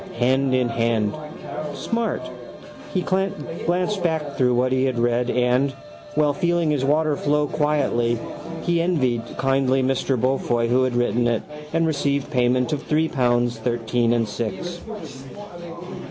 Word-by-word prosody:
Hand 130 Hz, +2 st, +2 dB
in 125 Hz, -1 st, +2 dB
hand. 115 Hz, -2 st, +1 dB, 0.6 s
Smart. 230 Hz, -, -1 dB, 0.7 s
He 185 Hz, -, 0 dB
glanced 185 Hz, +1 st, -1 dB
back 160 Hz, -4 st, -1 dB
through 125 Hz, -1 st, +3 dB
what 125 Hz, +1 st, +2 dB
he 130 Hz, 0 st, +2 dB
had 130 Hz, -2 st, 0 dB
read 120 Hz, +1 st, +1 dB
and, 125 Hz, +3 st, +2 dB, 0.4 s
while 150 Hz, -1 st, +3 dB
feeling 170 Hz, +1 st, +1 dB
his 145 Hz, -3 st, 0 dB
water 150 Hz, +2 st, +2 dB
flow 150 Hz, +1 st, +1 dB
quietly, 140 Hz, -6 st, +1 dB, 0.5 s
he 170 Hz, -1 st, +2 dB
envied 130 Hz, -9 st, +1 dB, 0.2 s
kindly 135 Hz, 0 st, +2 dB
Mr 130 Hz, 0 st, +1 dB
Beaufoy 120 Hz, -2 st, +1 dB
who 130 Hz, +2 st, +3 dB
had 125 Hz, -2 st, -1 dB
written 120 Hz, 0 st, +2 dB
it 115 Hz, -2 st, 0 dB, 0.3 s
and 165 Hz, +1 st, +2 dB
received 140 Hz, -3 st, 0 dB
payment 125 Hz, +1 st, +2 dB
of 145 Hz, -, -2 dB
three 155 Hz, +2 st, +1 dB
pounds, 120 Hz, -2 st, +1 dB
thirteen 120 Hz, 0 st, 0 dB
and 115 Hz, -2 st, +2 dB
six. 115 Hz, -, -4 dB
130 Hz, 140 wpm, -23 LUFS, 120-150 Hz, 0.7 s, through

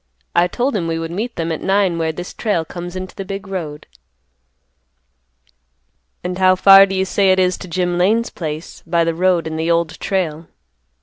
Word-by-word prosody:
I 175 Hz, +1 st, +4 dB
told 250 Hz, +8 st, -1 dB
him 175 Hz, -5 st, -1 dB
we 165 Hz, 0 st, -1 dB
would 165 Hz, 0 st, -4 dB
meet 225 Hz, +7 st, -4 dB
them 165 Hz, 0 st, -2 dB
at 160 Hz, -, -3 dB
nine 190 Hz, -3 st, +1 dB
where 160 Hz, -1 st, 0 dB
this 175 Hz, +3 st, -8 dB
trail 200 Hz, -8 st, -1 dB
comes 175 Hz, +2 st, -7 dB
into 185 Hz, 0 st, -6 dB
the 195 Hz, -, -5 dB
big 195 Hz, +1 st, -6 dB
road." 160 Hz, -6 st, -5 dB, 2.4 s
"And 180 Hz, +1 st, -4 dB
how 185 Hz, 0 st, +5 dB
far 195 Hz, +1 st, +8 dB
do 195 Hz, -, -3 dB
you 190 Hz, 0 st, +1 dB
say 195 Hz, 0 st, +2 dB
it 185 Hz, -, +3 dB
is 185 Hz, -1 st, +2 dB
to -, -, -8 dB
Jim 175 Hz, 0 st, -1 dB
Lane's 220 Hz, +6 st, +2 dB
place, 155 Hz, -1 st, -6 dB
by 170 Hz, 0 st, +2 dB
the 165 Hz, 0 st, 0 dB
road 180 Hz, 0 st, +1 dB
and 160 Hz, 0 st, -4 dB
the 165 Hz, +1 st, -1 dB
Old 170 Hz, -1 st, 0 dB
Trail?" 165 Hz, -5 st, -2 dB
180 Hz, 195 wpm, -18 LUFS, 165-195 Hz, 2.4 s, far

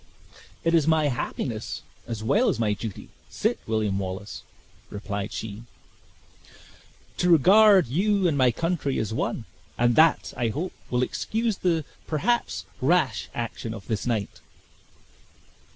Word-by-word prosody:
"It 165 Hz, -, +2 dB
is 160 Hz, -3 st, +3 dB
my 155 Hz, -2 st, +3 dB
happiness, 120 Hz, -2 st, -4 dB, 0.2 s
as 115 Hz, -2 st, -5 dB
well 215 Hz, -, +3 dB
as -, -, 0 dB
my 110 Hz, -2 st, +1 dB
duty, 105 Hz, -1 st, -7 dB, 0.2 s
Sit -, -, -1 dB
William 110 Hz, -3 st, 0 dB
Wallace," 95 Hz, +2 st, -5 dB, 0.5 s
replied 100 Hz, 0 st, -4 dB
she, 110 Hz, 0 st, -6 dB, 1.6 s
"to 180 Hz, -, +2 dB
regard 195 Hz, +4 st, +7 dB
you 190 Hz, -, +1 dB
and 160 Hz, -, +1 dB
my 130 Hz, -2 st, +4 dB
country 160 Hz, +1 st, -1 dB
as 110 Hz, 0 st, -2 dB
one; 110 Hz, -, -2 dB, 0.3 s
and 120 Hz, 0 st, +3 dB
that, 160 Hz, -1 st, +4 dB
I 120 Hz, -2 st, 0 dB
hope, 150 Hz, +11 st, -3 dB, 0.2 s
will 125 Hz, 0 st, +1 dB
excuse 220 Hz, -, -1 dB
the, 165 Hz, -4 st, +1 dB, 0.2 s
perhaps, 235 Hz, +11 st, 0 dB, 0.2 s
rash 135 Hz, -6 st, +1 dB
action 115 Hz, -1 st, -4 dB
of 100 Hz, -, -10 dB
this 110 Hz, +1 st, -2 dB
night." 110 Hz, -4 st, -2 dB
125 Hz, 135 wpm, -25 LUFS, 110-170 Hz, 1.6 s, regard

